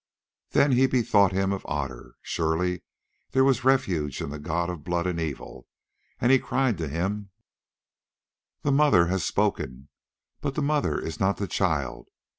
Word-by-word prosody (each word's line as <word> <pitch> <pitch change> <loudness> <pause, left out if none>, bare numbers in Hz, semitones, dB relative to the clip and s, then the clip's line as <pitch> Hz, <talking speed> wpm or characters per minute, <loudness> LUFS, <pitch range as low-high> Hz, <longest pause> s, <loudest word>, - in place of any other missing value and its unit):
Then 140 - +3
he 130 +1 +4
bethought 110 -6 +3
him 95 +1 0
of 95 - -5
Otter. 70 -4 -5
Surely 85 +2 -1 0.5
there 130 - +4
was 135 -2 +2
refuge 90 - +1
in - - -4
the 75 - -6
god 85 +4 -1
of 85 -4 -6
blood 85 +1 -1
and 90 -2 -1
evil; 80 -4 -6 0.5
and 120 - +3
he 135 - +6
cried 130 -9 0
to 80 - -2
him: 95 +6 -2 1.3
"The 145 - +2
Mother 140 -11 +5
has 95 -1 0
spoken, 65 +3 -1 0.5
but 140 - -3
the 150 - 0
Mother 150 0 +1
is 80 - -6
not 95 +1 +1
the 100 - -2
child. 80 -9 -1
95 Hz, 160 wpm, -26 LUFS, 80-125 Hz, 1.3 s, he